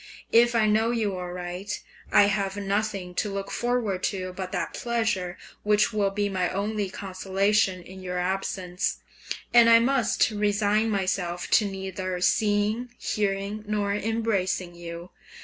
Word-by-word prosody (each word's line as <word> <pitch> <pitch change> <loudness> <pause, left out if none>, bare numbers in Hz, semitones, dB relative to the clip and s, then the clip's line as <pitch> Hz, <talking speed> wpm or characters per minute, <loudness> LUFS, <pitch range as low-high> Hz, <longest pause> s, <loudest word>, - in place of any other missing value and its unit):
If 240 +1 +5
I 225 -2 +4
know 215 +2 +3
you 220 -5 0
aright, 180 +2 -5 0.3
I 205 0 +7
have 200 -1 0
nothing 200 -2 -2
to 205 +3 -1
look 195 0 -4
forward 240 -6 0
to 185 -2 -3
but 185 0 -5
that - - -2
pleasure 220 -7 -1 0.2
which 210 0 +2
will 205 -2 +2
be 205 +1 -1
my 185 -3 0
only 205 0 -2
consolation 190 0 0
in 190 +1 -11
your 180 -1 -4
absence, 185 0 -1 0.6
and 235 -1 +8
I 230 - +9
must 245 -1 +2
resign 210 +1 +1
myself 185 -3 -1
to 215 - +5
neither 190 -1 -4
seeing, 210 +5 +1
hearing, 200 +1 -2
nor 205 -1 0
embracing 205 -5 -1
you. 170 +1 -8
200 Hz, 140 wpm, -26 LUFS, 185-215 Hz, 0.6 s, I